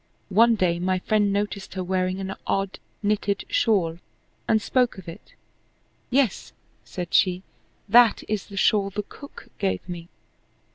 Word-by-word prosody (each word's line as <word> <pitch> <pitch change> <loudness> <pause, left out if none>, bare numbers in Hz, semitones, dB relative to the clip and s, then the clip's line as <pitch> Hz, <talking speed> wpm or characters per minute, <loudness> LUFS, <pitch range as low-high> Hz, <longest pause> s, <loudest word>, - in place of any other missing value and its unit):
One 230 +4 +5
day 175 -4 +1
my 185 +1 +1
friend 205 +2 +1
noticed 200 -1 -3
her 185 - -2
wearing 185 0 -1
an 195 0 -4
odd 195 -1 -1 0.2
knitted 205 -1 0
shawl, 190 - +1 0.5
and 220 - +4
spoke 250 +1 +1
of 190 - -11
it. 165 - -11 0.7
"Yes," 255 -5 +1 0.3
said 175 -2 -6
she, 185 -1 +3 0.4
"that 235 +1 +6
is 210 -2 -2
the 200 - -10
shawl 200 -1 +3
the 210 +2 -4
cook 285 +7 -13
gave 95 - -1
me." 170 -2 -7
195 Hz, 145 wpm, -24 LUFS, 185-215 Hz, 0.7 s, that